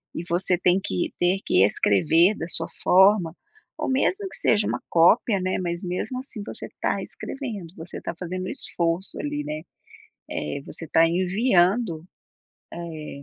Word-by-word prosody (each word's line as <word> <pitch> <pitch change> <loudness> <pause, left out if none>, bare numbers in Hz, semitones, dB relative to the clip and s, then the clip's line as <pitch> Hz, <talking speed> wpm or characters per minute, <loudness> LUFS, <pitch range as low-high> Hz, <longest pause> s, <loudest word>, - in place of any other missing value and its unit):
e 165 - -3
você 180 +1 +1
tem 180 +1 +3
que 190 -3 -2
ter 180 +2 +2
que 95 - +4
escrever 160 - +4
da 165 - -5
sua 165 -1 -4 0.2
forma, 190 -2 +5 0.4
ou - - -2
mesmo 370 +9 +1
que - - -9
seja 210 -1 +2
uma - - -2
cópia, 195 +5 +4
né, 185 0 -1
mas 170 0 -3
mesmo 180 +8 -3
assim, 255 -5 -7
você - - -7
tá - - 0
escrevendo, 220 - -6
você 165 +2 -8
tá - - -5
fazendo 185 +1 -4
um - - -4
esforço, 170 +2 -2
ali, 145 0 -3
né, 150 +1 -4 0.7
eh, 75 - -3
você 165 - -9
tá 165 - +4
enviando, 185 -1 +2 0.7
eh, 160 -4 -7
180 Hz, 160 wpm, -24 LUFS, 165-200 Hz, 0.7 s, forma